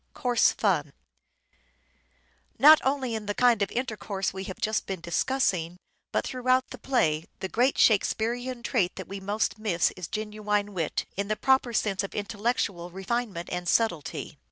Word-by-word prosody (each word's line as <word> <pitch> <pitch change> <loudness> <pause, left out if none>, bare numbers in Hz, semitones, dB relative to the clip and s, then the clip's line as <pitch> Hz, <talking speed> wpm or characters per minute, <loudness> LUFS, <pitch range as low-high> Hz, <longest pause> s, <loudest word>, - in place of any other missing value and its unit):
Coarse 245 -2 +3
fun. - - 0 1.6
Not 310 +3 +8
only 265 -3 0
in 215 -2 -4
the 205 - -2
kind 240 -4 +4
of 200 - +1
intercourse 210 -6 -3
we 190 0 -5
have 190 - -7
just 215 0 -1
been 190 -2 -3
discussing, 175 -1 0 0.3
but - - 0
throughout 255 0 +1
the 255 - -8
play 165 - +1
the 190 - -3
great 245 +7 +1
Shakespearean 235 +3 +1
trait 200 -8 0
that 190 - -7
we 195 0 -6
most 205 +3 -1
miss 195 -6 +1
is 180 -3 -7
genuine 210 -1 -2
wit, 165 -5 -2
in 200 0 -1
the 215 - 0
proper 265 0 +2
sense 210 -4 0
of 195 - -6
intellectual 205 -4 -2
refinement 195 -1 -3
and 180 -1 -2
subtlety. 195 -10 -1
210 Hz, 155 wpm, -27 LUFS, 190-245 Hz, 1.6 s, Not